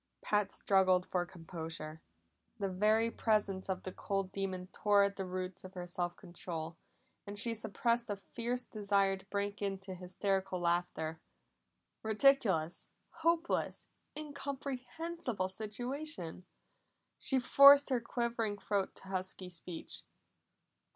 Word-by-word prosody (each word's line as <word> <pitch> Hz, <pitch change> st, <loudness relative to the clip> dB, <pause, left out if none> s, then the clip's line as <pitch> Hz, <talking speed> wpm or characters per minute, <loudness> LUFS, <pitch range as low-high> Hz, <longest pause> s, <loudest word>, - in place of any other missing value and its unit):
Pat 210 Hz, -2 st, +2 dB
struggled 185 Hz, -2 st, +3 dB
for 175 Hz, -1 st, -1 dB
composure. 160 Hz, -2 st, -6 dB, 0.6 s
The 200 Hz, -3 st, -1 dB
very 215 Hz, +4 st, +3 dB
presence 205 Hz, -5 st, +1 dB
of 185 Hz, -1 st, -1 dB
the 185 Hz, -, -4 dB
cold 195 Hz, 0 st, -2 dB
demon 190 Hz, -2 st, -3 dB
tore 205 Hz, -1 st, +4 dB
at 200 Hz, 0 st, +1 dB
the 190 Hz, -1 st, -3 dB
roots 185 Hz, 0 st, -4 dB
of 185 Hz, +1 st, -10 dB
her 180 Hz, -1 st, -4 dB
self 175 Hz, -1 st, -2 dB
control, 170 Hz, -3 st, -6 dB, 0.5 s
and 205 Hz, 0 st, -6 dB
she 230 Hz, +2 st, +2 dB
suppressed 230 Hz, +2 st, +1 dB
a 205 Hz, -, 0 dB
fierce 240 Hz, +5 st, -3 dB
desire 200 Hz, -2 st, +2 dB
to 190 Hz, 0 st, -13 dB
break 200 Hz, 0 st, -2 dB
into 195 Hz, -1 st, -3 dB
hysterical 190 Hz, +1 st, -1 dB
laughter. 170 Hz, -2 st, 0 dB, 0.8 s
Ridiculous, 215 Hz, -, +3 dB, 0.3 s
hopeless, 335 Hz, +1 st, +1 dB, 0.3 s
incomprehensible 280 Hz, -, -3 dB
situation! 220 Hz, -, -4 dB, 0.7 s
She 270 Hz, -, +3 dB
forced 280 Hz, +2 st, +8 dB
her 250 Hz, -2 st, +2 dB
quivering 230 Hz, -3 st, -1 dB
throat 200 Hz, -1 st, -1 dB
to 190 Hz, -, -10 dB
husky 185 Hz, -1 st, -3 dB
speech. 170 Hz, 0 st, -6 dB
195 Hz, 120 wpm, -34 LUFS, 185-230 Hz, 0.8 s, forced